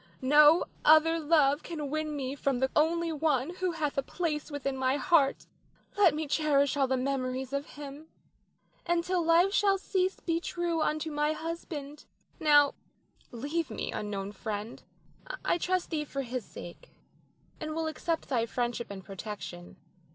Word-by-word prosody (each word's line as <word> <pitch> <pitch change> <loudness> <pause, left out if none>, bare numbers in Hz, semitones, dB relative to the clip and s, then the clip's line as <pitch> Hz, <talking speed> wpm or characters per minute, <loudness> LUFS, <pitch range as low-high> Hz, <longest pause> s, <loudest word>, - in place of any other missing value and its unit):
No 295 +4 +6 0.2
other 315 +2 +6
love 295 -2 +3
can 300 -5 -5
win 310 0 -2
me 270 -2 -3
from 275 -2 -1
the 265 0 +1
only 335 +2 +2
one 305 +1 0
who 365 -2 -1
hath 300 -4 -1
a - - +2
place 305 +1 -3
within 275 -2 -3
my 260 +1 +1
heart. 280 0 +2 0.5
Let 375 -7 +5
me 310 0 -3
cherish 285 -2 +2
all 275 -2 +2
the 260 0 +1
memories 260 0 -2
of 280 +1 -2
him, 290 +2 -9 0.8
and 345 -1 +1
till 360 -1 0
life 340 +4 +4
shall 400 -2 +3
cease 375 -1 -1
be 330 -1 -1
true 340 -1 -2
unto 310 +1 -1
my 295 +1 +1
husband. 310 -3 -6 0.3
Now 290 -3 +5 0.6
leave 290 +7 -2
me, 220 - -4
unknown 200 -1 -4
friend; 210 +2 -5 0.6
I 345 - +2
trust 365 +1 -1
thee 305 -2 -1
for 275 -1 -4
his 250 -1 -4
sake, 175 - -11 0.7
and 310 0 -4
will 325 0 -1
accept 320 +1 -2
thy 235 -4 0
friendship 240 0 -2
and 195 -2 -8
protection. 195 -3 -8
295 Hz, 160 wpm, -30 LUFS, 265-330 Hz, 0.8 s, No